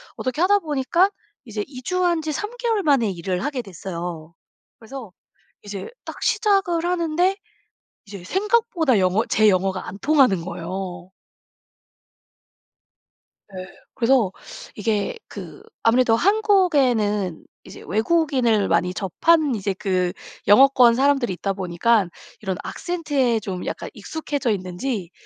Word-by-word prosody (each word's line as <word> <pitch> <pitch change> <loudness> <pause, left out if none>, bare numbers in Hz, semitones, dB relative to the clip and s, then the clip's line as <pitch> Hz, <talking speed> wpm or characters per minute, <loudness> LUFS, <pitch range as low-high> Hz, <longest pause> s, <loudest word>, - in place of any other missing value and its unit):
어떻게 255 +5 -3
하다 405 +3 +4
보니까 310 +3 +1 0.4
이제 215 -3 -4
이주한 340 +6 -1
지 310 0 -3
3 420 +8 -4
개월 460 -4 0
만에 275 - +3
일을 180 +1 -3
하게 285 -4 -2
됐어요. 170 -4 -7 0.5
그래서 230 -3 -9 0.5
이제 205 -2 -6 0.2
딱 - - -9
시작을 390 -7 +1
하는데 350 +1 +1 0.7
이제 200 -3 -10
생각보다 380 - +1
영어 185 +5 +2
제 215 -1 +4
영어가 185 0 0
안 195 - -8
통하는 265 - +3
거예요. 180 0 -6 2.4
네. 185 -1 -6 0.3
그래서 235 -5 +3 0.4
이게 210 - -1
그 - - -10 0.2
아무래도 230 0 +4
한국에는 275 - +2 0.2
이제 - - -12
외국인을 245 -4 +2
많이 170 +2 +1
접한 280 - +2
이제 200 -2 -2
그 185 -3 0 0.4
영어권 245 +1 +6
사람들이 270 -3 +2
있다 195 +2 -2
보니깐 190 +2 +1 0.3
이런 190 -3 -3
악센트에 290 -9 -1
좀 190 -3 -5
약간 - - -5
익숙해져 290 -5 -3
있는지 185 0 -3
235 Hz, 265 characters per minute, -22 LUFS, 190-315 Hz, 2.4 s, 영어권